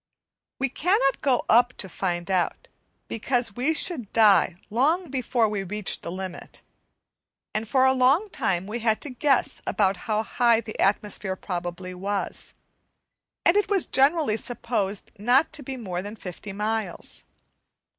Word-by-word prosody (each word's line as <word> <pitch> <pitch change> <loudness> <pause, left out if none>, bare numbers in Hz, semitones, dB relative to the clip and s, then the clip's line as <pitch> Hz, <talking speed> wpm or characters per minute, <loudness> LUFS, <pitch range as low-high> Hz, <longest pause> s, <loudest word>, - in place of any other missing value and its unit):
We 270 - +1
cannot 285 - +1
go 260 -3 +1
up 245 +2 +5
to 190 - -3
find 175 0 -3
out, 180 -2 0 0.4
because 235 -2 -1
we 275 +6 +1
should 275 - 0
die 205 -5 +5 0.2
long 300 - +1
before 250 -3 +1
we 210 -2 -2
reached 205 +1 -2
the 170 - -6
limit; 185 -1 -8 0.9
and 215 +1 -2
for 260 +3 +3
a 260 - +5
long 265 +10 +3
time 190 -8 -1
we 215 +4 -4
had 220 -1 +1
to 290 - -5
guess 265 +1 +1
about 195 -2 +2
how 215 0 +1
high 235 0 +3
the 220 -2 -8
atmosphere 200 -1 0
probably 180 0 -5
was, 195 +2 -4 0.9
and 340 - +5
it 415 -1 +2
was 395 -4 +3
generally 275 -4 +3
supposed 225 -5 -2
not 250 +9 +3
to 310 - 0
be 265 -1 -6
more 185 -7 -4
than 205 +3 -7
fifty 195 0 -8
miles. 210 -2 -3
225 Hz, 150 wpm, -25 LUFS, 195-265 Hz, 0.9 s, up